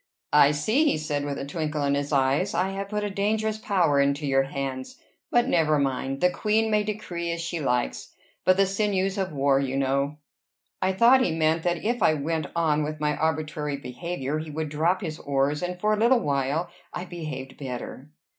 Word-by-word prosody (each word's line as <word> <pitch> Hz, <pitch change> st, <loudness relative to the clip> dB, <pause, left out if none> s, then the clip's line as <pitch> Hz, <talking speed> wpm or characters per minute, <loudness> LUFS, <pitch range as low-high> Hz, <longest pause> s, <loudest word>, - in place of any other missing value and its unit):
"I 145 Hz, -1 st, +7 dB
see!" 215 Hz, -, +2 dB
he 295 Hz, -, +2 dB
said, 145 Hz, -2 st, -2 dB
with 145 Hz, -1 st, -3 dB
a -, -, -4 dB
twinkle 150 Hz, 0 st, -2 dB
in 140 Hz, 0 st, +2 dB
his 140 Hz, +1 st, -1 dB
eyes. 140 Hz, +7 st, +2 dB
"I 185 Hz, +1 st, +1 dB
have 195 Hz, 0 st, -5 dB
put 210 Hz, 0 st, -2 dB
a 205 Hz, -, -1 dB
dangerous 215 Hz, +2 st, 0 dB
power 175 Hz, -9 st, +2 dB
into 140 Hz, +2 st, +1 dB
your 135 Hz, -1 st, +3 dB
hands. 135 Hz, -1 st, -5 dB, 0.3 s
But 240 Hz, 0 st, +3 dB
never 155 Hz, -3 st, +3 dB
mind. 135 Hz, -1 st, -1 dB
The 180 Hz, -, +4 dB
queen 220 Hz, +3 st, +1 dB
may 210 Hz, 0 st, +3 dB
decree 180 Hz, -5 st, -4 dB
as 170 Hz, -, -3 dB
she 170 Hz, 0 st, -3 dB
likes; 125 Hz, -4 st, -2 dB, 0.3 s
but 185 Hz, 0 st, +4 dB
the 195 Hz, -, +5 dB
sinews 195 Hz, -1 st, 0 dB
of 190 Hz, -3 st, -1 dB
war, 140 Hz, -1 st, +2 dB
you 135 Hz, -1 st, -1 dB
know" 140 Hz, +2 st, 0 dB, 0.6 s
I 185 Hz, -, +2 dB
thought 240 Hz, +7 st, +6 dB
he 180 Hz, -, +2 dB
meant 160 Hz, 0 st, +1 dB
that 175 Hz, +2 st, -1 dB
if 240 Hz, +1 st, 0 dB
I 155 Hz, -3 st, +4 dB
went 155 Hz, +2 st, -2 dB
on 155 Hz, -3 st, +2 dB
with 155 Hz, +1 st, -4 dB
my 150 Hz, 0 st, 0 dB
arbitrary 150 Hz, -1 st, -1 dB
behavior, 140 Hz, +2 st, -4 dB
he 155 Hz, 0 st, -6 dB
would 155 Hz, 0 st, -3 dB
drop 165 Hz, +5 st, +1 dB
his 160 Hz, -4 st, -5 dB
oars; 140 Hz, +1 st, 0 dB
and 180 Hz, 0 st, -3 dB
for 215 Hz, +3 st, +2 dB
a -, -, +1 dB
little 235 Hz, +2 st, +4 dB
while 145 Hz, +5 st, -1 dB, 0.2 s
I 180 Hz, -, -5 dB
behaved 155 Hz, -7 st, -7 dB
better. 130 Hz, +1 st, -6 dB
155 Hz, 200 wpm, -26 LUFS, 140-190 Hz, 0.6 s, I